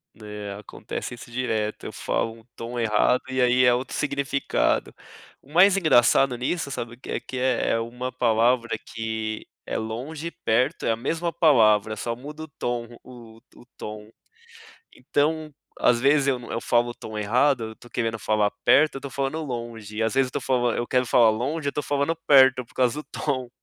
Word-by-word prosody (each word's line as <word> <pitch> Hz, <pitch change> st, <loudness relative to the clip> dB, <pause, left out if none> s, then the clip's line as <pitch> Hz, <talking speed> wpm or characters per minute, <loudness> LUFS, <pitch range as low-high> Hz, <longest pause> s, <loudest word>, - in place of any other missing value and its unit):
É, 105 Hz, -2 st, -7 dB
acontece 105 Hz, -, -7 dB
isso 120 Hz, -, -12 dB
direto, 110 Hz, -3 st, -2 dB
eu -, -, -5 dB
falo 115 Hz, -, -2 dB
um -, -, -20 dB
tom 120 Hz, +1 st, -5 dB
errado 115 Hz, +2 st, +2 dB
e 130 Hz, 0 st, -2 dB
aí 125 Hz, 0 st, +4 dB
é 125 Hz, -, +6 dB
outro 125 Hz, +2 st, -3 dB
significado. 140 Hz, -1 st, 0 dB, 0.5 s
O 140 Hz, -, -20 dB
mais 190 Hz, +3 st, +6 dB
engraçado 135 Hz, -5 st, +4 dB
nisso 140 Hz, +3 st, -2 dB
sabe 115 Hz, -4 st, -5 dB
o -, -, -28 dB
que -, -, -8 dB
é -, -, -1 dB
que 130 Hz, -, -8 dB
é, 125 Hz, -1 st, +1 dB
é 115 Hz, -, +2 dB
uma 125 Hz, +2 st, -4 dB
palavra 120 Hz, 0 st, +2 dB
que 110 Hz, -1 st, -4 dB, 0.2 s
é -, -, -3 dB
longe 130 Hz, +9 st, -5 dB
e -, -, -5 dB
perto, 125 Hz, -7 st, 0 dB
é -, -, +2 dB
a -, -, +1 dB
mesma 165 Hz, +8 st, -2 dB
palavra, 110 Hz, -, +4 dB
só 115 Hz, +2 st, -3 dB
muda 150 Hz, +5 st, -9 dB
o -, -, -8 dB
tom 120 Hz, -5 st, -4 dB, 0.2 s
o 115 Hz, -3 st, -13 dB, 0.2 s
o -, -, -16 dB
o -, -, -18 dB
tom. 105 Hz, 0 st, -8 dB, 0.9 s
Então, 155 Hz, +1 st, -1 dB, 0.2 s
às 120 Hz, -1 st, +3 dB
vezes, 140 Hz, +2 st, +3 dB
eu 135 Hz, -2 st, +2 dB
não 120 Hz, -, -10 dB
eu 115 Hz, -, -2 dB
falo 120 Hz, 0 st, +2 dB
o -, -, -7 dB
tom 110 Hz, -2 st, -9 dB
errado, 125 Hz, +6 st, +2 dB
eu 110 Hz, -, -12 dB
tô 120 Hz, -, -16 dB
querendo 115 Hz, -2 st, -2 dB
falar 105 Hz, -1 st, +1 dB
perto 155 Hz, -1 st, +5 dB
eu -, -, -6 dB
tô 140 Hz, -, -7 dB
falando 135 Hz, +4 st, -2 dB
longe 115 Hz, -5 st, -6 dB
e, -, -, +1 dB
às 110 Hz, -, 0 dB
vezes, 135 Hz, -1 st, +3 dB
eu -, -, -14 dB
tô -, -, -2 dB
falan 125 Hz, -2 st, +1 dB
eu 120 Hz, -, -2 dB
quero 125 Hz, 0 st, +2 dB
falar 115 Hz, -1 st, +5 dB
longe 140 Hz, +7 st, -2 dB
eu -, -, -2 dB
tô 150 Hz, -, -2 dB
falando 145 Hz, +3 st, 0 dB
perto, 130 Hz, -2 st, +6 dB
por -, -, -24 dB
causa 125 Hz, +3 st, +1 dB
do -, -, -12 dB
tom. 130 Hz, -4 st, -2 dB
125 Hz, 205 wpm, -24 LUFS, 115-140 Hz, 0.9 s, é